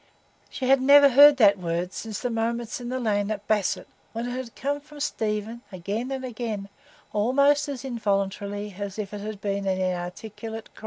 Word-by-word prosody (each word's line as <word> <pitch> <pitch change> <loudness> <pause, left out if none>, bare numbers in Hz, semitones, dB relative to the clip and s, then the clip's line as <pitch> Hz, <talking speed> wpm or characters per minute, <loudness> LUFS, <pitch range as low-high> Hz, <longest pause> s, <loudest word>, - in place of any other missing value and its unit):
She 260 - -4
had 270 0 +5
never 280 +1 +8
heard 285 +2 +8
that 200 -5 +5
word 175 +1 -2
since 220 -3 -5
the 245 - -1
moments 230 +1 -2
in 240 - -5
the 255 +1 -2
lane 205 -4 0
at 210 -1 -4
Basset, 210 -3 +1 0.3
when 230 +1 -3
it - - -3
had 250 -2 -6
come 285 +2 -2
from 295 0 -14
Stephen 220 -3 -2
again 200 +7 -4
and 265 -1 -3
again, 220 -5 -4 0.4
almost 280 +7 +3
as 270 -2 -5
involuntarily 205 -3 -2
as 200 -1 -5
if 210 -2 -5
it 205 - -5
had 210 -1 -6
been 200 -1 -2
an 190 -1 0
inarticulate 210 +5 -5
cry. - - -16
220 Hz, 190 wpm, -25 LUFS, 200-255 Hz, 0.4 s, never